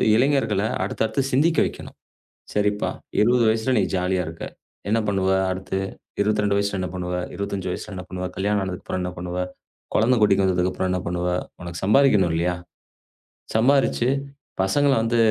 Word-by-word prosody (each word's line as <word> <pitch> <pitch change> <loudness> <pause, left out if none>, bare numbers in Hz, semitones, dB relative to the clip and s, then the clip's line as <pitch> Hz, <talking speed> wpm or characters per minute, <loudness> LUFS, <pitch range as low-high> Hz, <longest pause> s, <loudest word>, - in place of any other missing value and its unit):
இளைஞர்களை 115 -5 +2 0.2
அடுத்தடுத்துச் 110 +5 -1
சிந்திக்க 160 +5 +3
வெக்கணும். - - -10 0.6
சரிப்பா. 105 0 +1 0.3
20 120 +2 +4
வயசுல 110 +3 +1
நீ - - +3
ஜாலியா 90 0 0
இருக்க. 80 0 -7 0.4
என்ன 110 +2 +3
பண்ணுவ, 95 -1 +1 0.2
அடுத்து? 95 +1 -3 0.4
22 105 -1 +2
வயசுல 100 -1 -1
என்ன 90 - -2
பண்ணுவ? 90 0 -3 0.2
25 100 -2 -3
வயசுல 105 +3 -5
என்ன 90 -1 -6
பண்ணுவ? 90 0 -5
கல்யாணம் 100 +1 +1
ஆனதுக்கு 90 -1 -6
அப்புறம் 95 - -3
என்ன 90 - -2
பண்ணுவ? 90 +1 -5 0.6
குழந்தை 120 +4 +4
குட்டிக்கு 100 -2 +4
வந்ததுக்கு 90 0 +1
அப்புறம் 95 0 -1
என்ன 90 - 0
பண்ணுவ? 90 +1 -1 0.3
உனக்குச் 85 0 -6
சம்பாதிக்கணும் 105 -5 +4
இல்லையா? 90 +2 +1 1.0
சம்பாரிச்சு 125 +1 +3 0.5
பசங்கள 140 +9 +3
வந்து 115 +1 +1
100 Hz, 150 wpm, -23 LUFS, 90-110 Hz, 1.0 s, 20